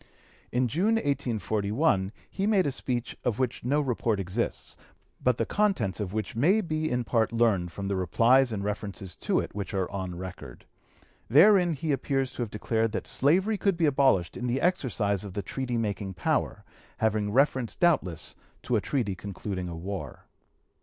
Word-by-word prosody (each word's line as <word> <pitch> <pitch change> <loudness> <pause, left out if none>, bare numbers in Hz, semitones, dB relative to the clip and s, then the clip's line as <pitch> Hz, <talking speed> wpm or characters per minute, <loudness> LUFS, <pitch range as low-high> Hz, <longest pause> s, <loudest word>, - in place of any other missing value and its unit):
In 125 +1 +2
June, 185 - +2
1841, 110 - 0 0.2
he 195 +1 -2
made 200 -5 +3
a 140 - +1
speech 125 -2 -3
of 120 -4 0
which 130 -3 -1
no 140 +5 +2
report 120 -6 0
exists, 95 +5 -2 0.5
but 125 -2 +3
the 115 - 0
contents 195 - 0
of 100 -3 -3
which 110 +1 -3
may 170 - +4
be 155 -5 -1
in 125 0 0
part 115 -1 +1
learned 110 -7 +2
from 100 +2 -5
the 100 - 0
replies 115 +8 +4
and 100 -2 -3
references 100 -3 -4
to - - +1
it - - -4
which 100 -1 -4
are 95 -2 0
on 95 -3 -4
record. 90 -9 -9 0.6
Therein 175 - +6
he 155 +1 -2
appears 135 -1 0
to - - -6
have 115 - -2
declared 110 +1 -1
that - - -3
slavery 190 +9 +2
could 195 -4 +1
be 170 - +2
abolished 130 - +3
in 125 - -3
the 125 +2 0
exercise 115 - 0
of 100 -3 -7
the 100 0 -3
treaty 125 +3 -3
making 100 -4 -2
power, - - -1 0.3
having 105 -2 +1
reference 130 -1 +2
doubtless 95 - +1 0.3
to - - 0
a - - +2
treaty 120 -9 -1
concluding 95 -1 -5
a 85 - -6
war. 95 +4 -6
115 Hz, 175 wpm, -28 LUFS, 100-140 Hz, 0.6 s, Therein